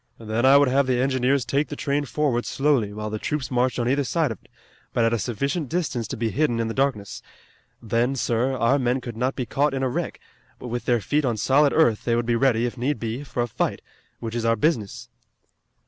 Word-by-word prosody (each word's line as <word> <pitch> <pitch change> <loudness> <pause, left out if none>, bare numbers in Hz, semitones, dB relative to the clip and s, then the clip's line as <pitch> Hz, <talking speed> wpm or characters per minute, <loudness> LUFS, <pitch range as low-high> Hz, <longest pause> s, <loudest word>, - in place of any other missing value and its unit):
Then 115 +3 0
I 135 +1 +8
would 140 0 +4
have 135 +1 +2
the 125 -1 +1
engineers 130 0 +1
take 145 +2 0
the 145 - -6
train 145 0 -1
forward 130 -2 -1
slowly, 135 -7 +1
while 105 +1 -5
the 110 - -3
troops 140 0 -3
marched 125 0 +1
on 120 -1 0
either 140 +3 +2
side 155 0 0
of 110 - -7
it, - - -25 0.4
but 115 - +2
at 115 - +2
a 115 - 0
sufficient 140 - -2
distance 140 -10 -2
to - - -5
be 115 0 -1
hidden 140 -6 +1
in 115 - 0
the 115 - -3
darkness. 130 -7 -1 0.6
Then, 115 +4 0
sir, 125 +2 0
our 130 +5 +2
men 125 0 +1
could 120 -3 -7
not 125 +4 -1
be 125 - -3
caught 140 +3 0
in 135 - -2
a 130 - +1
wreck, - - -3 0.4
but 125 - -8
with 120 +1 -4
their 120 -2 +2
feet 150 +10 0
on 120 -4 0
solid 140 +6 +3
earth 120 -10 +3
they 115 - +1
would 120 0 0
be 120 0 +1
ready, 120 -1 +2
if 120 0 -4
need 130 0 -1
be, 115 +5 -4
for 125 -3 -2
a - - -3
fight, 110 - -2 0.4
which 115 -1 -5
is 120 -1 -2
our 115 0 +3
business." 115 - -1
125 Hz, 240 wpm, -24 LUFS, 115-140 Hz, 0.6 s, I